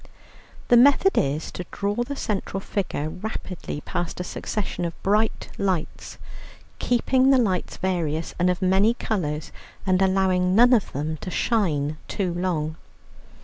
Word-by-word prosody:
The 240 - +7
method 285 +10 +5
is 145 +3 0
to 180 - -6
draw 200 0 -1
the 280 +4 -5
central 200 -5 -3
figure 190 -6 -3
rapidly 185 -3 -6
past 175 +3 -4
a - - -1
succession 185 0 -4
of 170 -1 -5
bright 210 +3 +1
lights, 185 -5 -2 0.6
keeping 255 +2 +2
the 270 - +6
lights 195 -8 0
various 165 -4 -1
and 180 +1 +3
of 180 +1 -1
many 195 +5 +3
colours 155 - -3 0.3
and 185 -1 +2
allowing 185 -1 +2
none 245 +3 +6
of 225 -5 +2
them 155 +3 -3
to 185 - -7
shine 155 -9 0
too 185 -4 -2
long. 165 -3 -2
185 Hz, 145 wpm, -24 LUFS, 165-215 Hz, 0.6 s, The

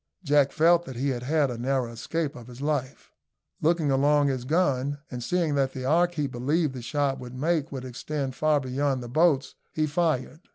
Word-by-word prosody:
Jack 145 -3 +3
felt 170 +2 +4
that 130 - -8
he 135 +4 -1
had 125 -3 -2
had 145 +1 +1
a 120 - -6
narrow 130 -1 0
escape 150 +6 -3
of 120 -3 -11
his 125 0 -11
life. 140 -2 -3 0.5
Looking 160 -2 +2
along 145 +1 +3
his 130 -2 -2
gun, 145 -3 +1
and 125 -2 -5
seeing 170 0 0
that 135 -2 +1
the 130 -1 -5
arc 175 +5 +2
he 150 -2 0
believed 140 +4 0
the 130 - -6
shot 135 +2 -1
would 125 0 -9
make 155 +2 0
would 130 -2 -5
extend 135 +2 -4
far 150 +2 +2
beyond 130 0 -1
the - - -7
boats, 145 -1 +2 0.2
he 155 - +2
fired. 155 -2 -1
140 Hz, 200 wpm, -26 LUFS, 130-155 Hz, 0.5 s, felt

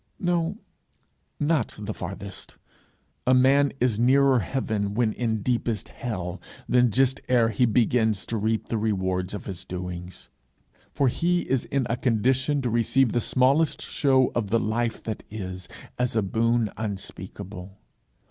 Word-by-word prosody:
no, 175 +1 0 0.8
not 150 -5 +1
the 105 0 -5
farthest! 100 +2 -8 0.7
a 130 - +6
man 135 +2 +4
is 120 -3 +1
nearer 135 +1 +4
heaven 105 0 -2
when 115 -2 +2
in 110 -4 -2
deepest 120 -2 -1
hell 90 -6 -5 0.3
than 125 -1 +4
just 130 +4 +2
ere 120 -3 +4
he 115 +3 +2
begins 110 -2 +2
to 115 - -3
reap 110 +1 -1
the 115 - 0
reward 95 -4 -1
of - - -7
his 95 -2 -6
doings 90 -1 -7 0.6
for 140 - +1
he 175 +7 +1
is 135 -6 -1
in 135 -2 -1
a 115 - 0
condition 130 +3 +1
to 125 - 0
receive 120 +2 +3
the 120 - +1
smallest 135 +7 +2
show 130 -3 +2
of 115 -4 -1
the 115 +2 +3
life 115 +2 -1
that 110 -2 -4
is, 95 -4 -6 0.3
as 125 -2 0
a 110 - +2
boon 115 +2 +1
unspeakable. 95 -2 -6
115 Hz, 145 wpm, -25 LUFS, 100-130 Hz, 0.8 s, a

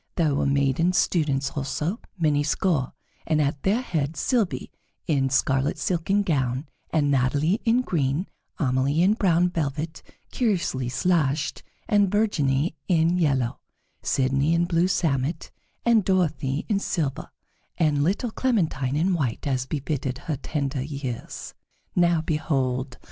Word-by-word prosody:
There 160 -4 +2
were 140 - +1
maiden 140 +5 +2
students 145 -6 +1
also, 150 - -2 0.2
many 150 -4 +2
score, 150 -2 0 0.3
and 155 -1 +2
at 140 -1 0
their 210 +6 +2
head 155 - -2
Sylvie, 225 - 0 0.3
in 135 -4 +1
scarlet 135 +2 +1
silken 185 +5 +1
gown, 130 -5 0 0.2
and 145 -3 +1
Natalie 145 - +2
in 235 +2 +4
green; 155 - 0 0.3
Amelie 140 +2 +1
in 195 +3 +5
brown 180 -4 +2
velvet, 160 0 -3 0.3
curiously 170 - 0
slashed, 150 0 0 0.3
and 205 -3 +3
Virginie 160 -8 +1
in 170 0 +3
yellow; 135 -7 +1 0.4
Sidonie 135 +4 +1
in 170 +1 +2
blue 175 0 +2
samite, 155 -3 -1 0.3
and 230 -3 +4
Dorothée 155 -7 0
in 205 -3 +1
silver, 155 -9 -2 0.5
and 150 -3 +2
little 205 - 0
Clementine 160 - 0
in 175 +5 +2
white, 135 -10 -2
as 130 -2 -1
befitted 140 -3 -2
her 150 +2 -3
tender 140 -1 -2
years. 135 -4 -6 0.4
Now 175 -2 +3
behold! 135 -5 -1
155 Hz, 130 wpm, -25 LUFS, 135-175 Hz, 0.5 s, in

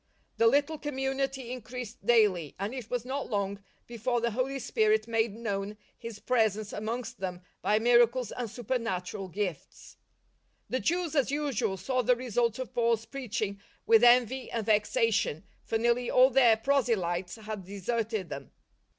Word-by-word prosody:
The 230 - +5
little 290 +5 +2
community 270 -2 -2
increased 250 -1 -7
daily, 200 - +3
and 200 +5 -3
it 250 -4 -7
was 245 -1 -2
not 270 +2 -4
long 200 -1 -2 0.2
before 240 +1 -1
the 235 0 0
Holy 260 +4 -1
Spirit 215 -3 +1
made 225 -2 0
known 205 -2 -3 0.2
His 230 -2 -8
Presence 215 -3 0
amongst 235 +3 -4
them 180 -2 -4 0.2
by 210 - +2
miracles 240 +1 +3
and 245 -3 -4
supernatural 205 -6 -3
gifts. 185 -4 -5 0.7
The 255 - +1
Je^vs, 345 -1 0
as 275 -4 +2
usual, 280 -9 -1
saw 255 +5 0
the 250 +1 +3
results 235 -2 0
of 255 0 -6
Paul's 230 -2 +1
preaching 215 -7 -4 0.2
with 225 0 +5
envy 245 +1 +4
and 230 -3 -3
vexation, 210 -5 +1 0.2
for 225 - 0
nearly 240 +2 +1
all 255 +1 +6
their 240 -4 +5
proselytes 215 -9 0
had 215 -3 -7
deserted 205 +1 -3
them. 140 -2 -7
230 Hz, 150 wpm, -29 LUFS, 210-250 Hz, 0.7 s, all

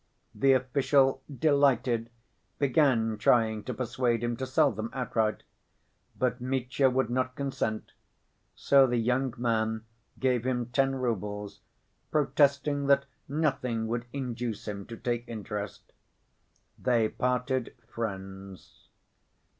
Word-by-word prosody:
The 135 0 +4
official, 130 +1 +2
delighted, 135 -5 +2 0.5
began 125 -6 +2
trying 110 -1 +3
to 125 - -3
persuade 120 -1 0
him 120 0 0
to 130 - -3
sell 145 +2 +3
them 110 +1 -4
outright. 115 -4 -1 0.7
But 125 0 0
Mitya 130 +1 +1
would 125 -2 0
not 130 0 -1
consent, 130 -6 -3 0.6
so 135 -1 +5
the 120 -1 0
young 125 +3 +1
man 110 -2 0 0.3
gave 125 -3 +1
him 125 -1 0
ten 135 0 +2
roubles, 105 -5 -3 0.5
protesting 145 -1 +2
that 140 0 +4 0.2
nothing 135 -6 0
would 120 0 -2
induce 120 -5 -4
him 100 -1 -5
to 115 - -8
take 120 0 -2
interest. 105 -2 -6 0.9
They 120 -3 +2
parted 125 +1 -1
friends. 95 -4 -7
125 Hz, 115 wpm, -29 LUFS, 115-135 Hz, 0.9 s, so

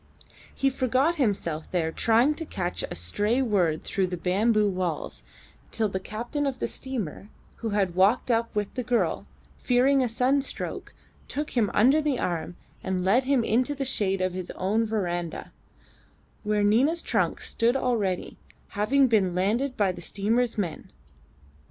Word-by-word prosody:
He 270 0 +1
forgot 260 +6 +1
himself 190 - -1
there 165 -3 0
trying 230 - +3
to 325 - -6
catch 180 -2 -3
a - - -6
stray 205 - 0
word 185 -11 +1
through 190 -2 -1
the 180 0 -4
bamboo 210 +5 +2
walls, 180 -5 -3 0.5
till 220 -2 0
the 190 - -3
captain 240 +9 -3
of 265 -2 -2
the - - -2
steamer, 215 - -5 0.3
who 230 - -3
had 200 -4 0
walked 200 +8 +3
up 230 -1 0
with 205 -1 -2
the 255 - -2
girl, 225 -9 0 0.3
fearing 265 +2 +3
a 250 - +1
sunstroke, 255 +4 -1 0.3
took 295 +1 -4
him 225 -5 +1
under 265 +8 +5
the 295 -4 0
arm 175 -2 -3 0.3
and 185 -1 -2
led 235 +7 +3
him 270 -3 +2
into 250 +6 +1
the 275 0 -3
shade 195 -7 +1
of 185 -1 0
his 185 -1 -5
own 215 +5 0
verandah: 175 -6 -3 0.9
where 210 -1 0
Nina's 265 +11 +3
trunk - - 0
stood 235 +2 0
already, 220 -9 -1 0.3
having 265 +7 +2
been 195 -7 +2
landed 230 +9 0
by 200 -3 +2
the 175 -1 -9
steamer's 225 +6 0
men. 175 -7 -3
215 Hz, 160 wpm, -26 LUFS, 185-255 Hz, 0.9 s, under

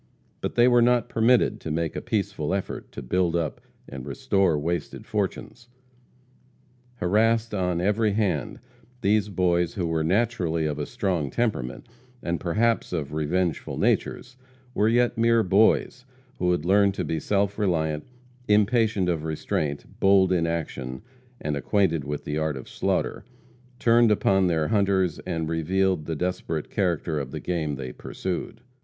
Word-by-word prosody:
But - - -3
they 120 0 +5
were 120 -1 +5
not 120 0 +3
permitted 120 +1 +3
to - - -6
make 80 +1 -2
a - - -3
peaceful 100 - -1
effort 100 - -5
to - - -7
build 85 +6 +1
up 80 -4 -2 0.3
and 65 -2 -8
restore 80 +5 +1
wasted 85 +4 -3
fortunes. 105 +3 -4 1.3
Harassed 110 +4 +1
on 90 -3 0
every 105 +3 +1
hand, 95 - -1 0.4
these 105 0 +2
boys, 90 -3 +1
who 90 - -1
were 80 -1 0
naturally 90 -4 0
of 75 -1 -2
a 75 - -3
strong 95 - -1
temperament, 85 - -2 0.4
and 85 0 -1
perhaps 110 +6 +1
of 75 -5 -3
revengeful 80 +1 -1
natures, 125 +1 -1 0.4
were 105 -1 +2
yet 120 0 +2
mere 115 0 +4
boys 105 +6 +3 0.4
who 90 - +1
had 85 -3 -1
learned 100 +1 +4
to - - -2
be 80 - -2
self 100 +4 0
reliant; 80 -6 0 0.4
impatient 105 -2 +3
of 85 -3 -1
restraint, 75 -2 -2
bold 95 -1 +5
in 85 -2 +2
action, 70 -5 -4 0.4
and 75 -1 -2
acquainted 85 0 +1
with 75 0 -4
the 75 +1 -2
art 80 -3 -1
of 65 - -9
slaughter, - - -1 0.5
turned 120 -1 +4
upon 95 -2 +3
their 80 -3 0
hunters 100 -5 +1
and 80 -3 -2
revealed 85 +1 0
the 80 - -2
desperate 85 -2 -3
character 85 -5 0
of 70 -2 -5
the - - -5
game 80 -5 -2
they 65 -2 -6
pursued. 95 - -5
90 Hz, 150 wpm, -25 LUFS, 80-105 Hz, 1.3 s, they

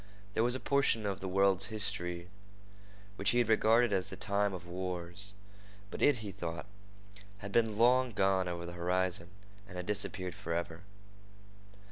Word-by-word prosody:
There 110 - +1
was 120 +1 +2
a - - -3
portion 135 -6 +2
of 100 -1 -2
the 95 - -5
world's 95 0 +3
history 100 -6 -1 0.9
which 100 - +1
he 120 - +2
had 120 -2 +3
regarded 110 +1 +4
as 95 -2 0
the - - -6
time 100 0 +1
of 90 -2 -7
wars, 90 +2 -4 0.6
but - - -6
it, 145 - +5
he 100 - -4
thought, 85 -3 -5 0.7
had 100 0 -7
been 110 -1 +2
long 125 +2 +5
gone 95 -3 +2
over 85 -1 -4
the 85 - -7
horizon 90 0 -1 0.4
and 90 - -9
had 90 - -4
disappeared 100 -3 -2
forever. 85 0 -4
95 Hz, 160 wpm, -33 LUFS, 90-105 Hz, 0.9 s, it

